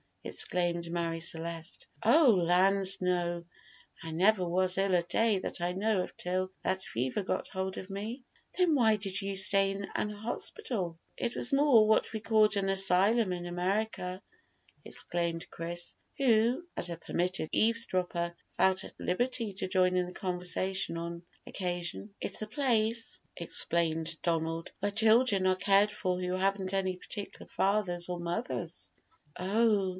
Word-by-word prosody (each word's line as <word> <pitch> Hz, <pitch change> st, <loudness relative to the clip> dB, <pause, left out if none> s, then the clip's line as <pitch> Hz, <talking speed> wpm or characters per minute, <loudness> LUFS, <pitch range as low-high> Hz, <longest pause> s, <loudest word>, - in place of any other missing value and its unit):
exclaimed 175 Hz, -1 st, -1 dB
Marie 170 Hz, -1 st, -1 dB
Celeste. 165 Hz, 0 st, -5 dB, 0.2 s
"Oh 270 Hz, +5 st, +6 dB
lands, 190 Hz, +1 st, +3 dB
no! 175 Hz, -1 st, 0 dB, 0.6 s
I 165 Hz, -, -6 dB
never 185 Hz, +3 st, +3 dB
was 185 Hz, +1 st, +1 dB
ill 195 Hz, -1 st, +2 dB
a 175 Hz, -, +3 dB
day 215 Hz, +4 st, +2 dB
that 185 Hz, -, -5 dB
I 175 Hz, +1 st, 0 dB
know 200 Hz, +1 st, +1 dB
of -, -, -6 dB
till 185 Hz, +1 st, -2 dB
that 190 Hz, 0 st, 0 dB
fever 125 Hz, -, -2 dB
got 190 Hz, -, -3 dB
hold 190 Hz, -1 st, -3 dB
of 190 Hz, -, -7 dB
me." 215 Hz, +6 st, -5 dB, 0.3 s
"Then 360 Hz, -3 st, +4 dB
why 225 Hz, -5 st, +4 dB
did 195 Hz, -1 st, -2 dB
you 195 Hz, 0 st, -2 dB
stay 195 Hz, 0 st, +4 dB
in 195 Hz, 0 st, -4 dB
an 210 Hz, -, -1 dB
hospital?" 210 Hz, -, -3 dB, 0.2 s
"It 240 Hz, 0 st, -2 dB
was -, -, 0 dB
more 275 Hz, -6 st, +6 dB
what 220 Hz, +1 st, +2 dB
we 220 Hz, -, -2 dB
call 215 Hz, -1 st, +4 dB
an 195 Hz, -1 st, 0 dB
asylum 195 Hz, +3 st, +3 dB
in 175 Hz, -1 st, -5 dB
America," 185 Hz, +1 st, -2 dB, 0.6 s
explained 170 Hz, -1 st, -2 dB
Chris, 170 Hz, +1 st, -5 dB, 0.2 s
who, 245 Hz, +3 st, +3 dB
as 175 Hz, -, 0 dB
a 170 Hz, -, -4 dB
permitted 175 Hz, 0 st, -2 dB
eavesdropper, 185 Hz, -6 st, 0 dB, 0.2 s
felt 190 Hz, 0 st, +3 dB
at -, -, -11 dB
liberty 230 Hz, +2 st, 0 dB
to 190 Hz, -, -2 dB
join 185 Hz, -1 st, +2 dB
in 180 Hz, -1 st, +1 dB
the 180 Hz, -, -9 dB
conversation 185 Hz, 0 st, -1 dB
on 170 Hz, +1 st, -5 dB, 0.2 s
occasion. 180 Hz, +2 st, -3 dB
"It's -, -, -2 dB
a 215 Hz, -, -3 dB
place," 230 Hz, -3 st, 0 dB, 0.2 s
explained 165 Hz, -1 st, 0 dB
Donald, 165 Hz, -1 st, -1 dB
"where 205 Hz, +1 st, -1 dB
children 220 Hz, -1 st, +4 dB
are 185 Hz, 0 st, +4 dB
cared 200 Hz, +2 st, +3 dB
for 185 Hz, -3 st, -2 dB
who 180 Hz, 0 st, -2 dB
haven't 190 Hz, 0 st, 0 dB
any 190 Hz, -1 st, 0 dB
particular 200 Hz, +2 st, -6 dB
fathers 190 Hz, -3 st, 0 dB
or 175 Hz, -1 st, -3 dB
mothers." 175 Hz, +8 st, -4 dB, 0.5 s
"Oh!" 205 Hz, +1 st, +2 dB
190 Hz, 150 wpm, -31 LUFS, 175-215 Hz, 0.6 s, Oh